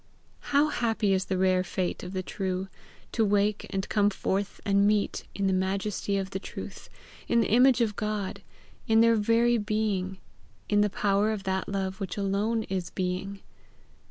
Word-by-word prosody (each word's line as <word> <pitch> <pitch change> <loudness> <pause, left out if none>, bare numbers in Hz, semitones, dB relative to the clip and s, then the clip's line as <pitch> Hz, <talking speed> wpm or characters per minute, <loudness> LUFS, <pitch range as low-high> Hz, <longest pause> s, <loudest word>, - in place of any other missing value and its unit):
Happy 235 -8 +2
is 190 0 +1
the 190 - -1
rare 185 0 +3
fate 185 -1 -2
of 180 - -7
the 185 -1 -3
true 190 0 -3 0.4
to 225 - +1
wake 205 0 +1
and 190 0 -2
come 205 -1 +3
forth 195 0 -2
and 200 0 +4
meet 210 -1 0
in 200 - -1
the 190 - +2
majesty 195 +1 -1
of 195 0 -3
the 190 - -3
truth, - - -8 0.4
in 235 - +3
the 225 - +1
image 250 +2 +5
of 215 -3 +1
God, 205 -2 -3 0.5
in 225 0 +5
their 230 0 +5
very 230 +2 +3
being, 205 -3 -1 0.5
in 205 0 +3
the 210 - +3
power 200 +1 +1
of 210 -3 -4
that 190 0 -2
love 195 -1 -2
which 190 -2 -4
alone 205 +3 0
is 185 -4 -3
being. 190 +2 -3
200 Hz, 170 wpm, -28 LUFS, 190-215 Hz, 0.5 s, image